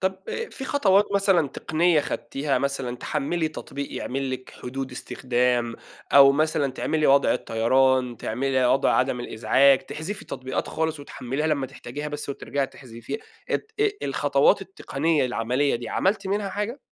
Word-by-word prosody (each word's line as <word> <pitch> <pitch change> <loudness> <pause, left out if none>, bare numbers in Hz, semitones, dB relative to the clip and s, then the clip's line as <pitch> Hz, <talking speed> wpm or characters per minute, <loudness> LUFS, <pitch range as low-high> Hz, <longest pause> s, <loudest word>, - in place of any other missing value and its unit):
.طب 190 0 0
آآ 460 - -3
في 265 - -7
خطوات 205 -8 +3
مثلًا 195 -7 +3
تقنية 160 +3 +2
خدتيها 140 0 -2
مثلًا 135 -3 -2
تحملي 155 +5 -1
تطبيق 140 -2 -7
يعمل 135 +1 -3
لِك 130 0 -6
حدود 135 +1 -5
استخدام، 125 -2 0 0.4
أو 140 0 +9
مثلًا 145 -2 +1
تعملي 155 +3 0
وضع 140 +1 +5
الطيران 125 +2 +2
تعملي 130 +4 0
وضع 130 - +3
عدم 125 -1 +1
الإزعاج 130 +4 +4
تحذفي 195 +11 -6
تطبيقات 130 0 -4
خالص 160 -1 -2
وتحمليها 140 +1 -3
لما 140 -4 0
تحتاجيها 145 +4 -7
بس 145 -1 -6
وترجعي 140 0 -2
تحذفيها 120 - -8 0.3
ات 445 - -2
ال 425 0 0
الخطوات - - +3
التقنية 155 - -1
العملية 125 +4 0
دي 120 - -7
عملتِ 195 0 0
منها 200 +1 -1
حاجة؟ 210 +8 -4
140 Hz, 145 wpm, -25 LUFS, 130-165 Hz, 0.4 s, أو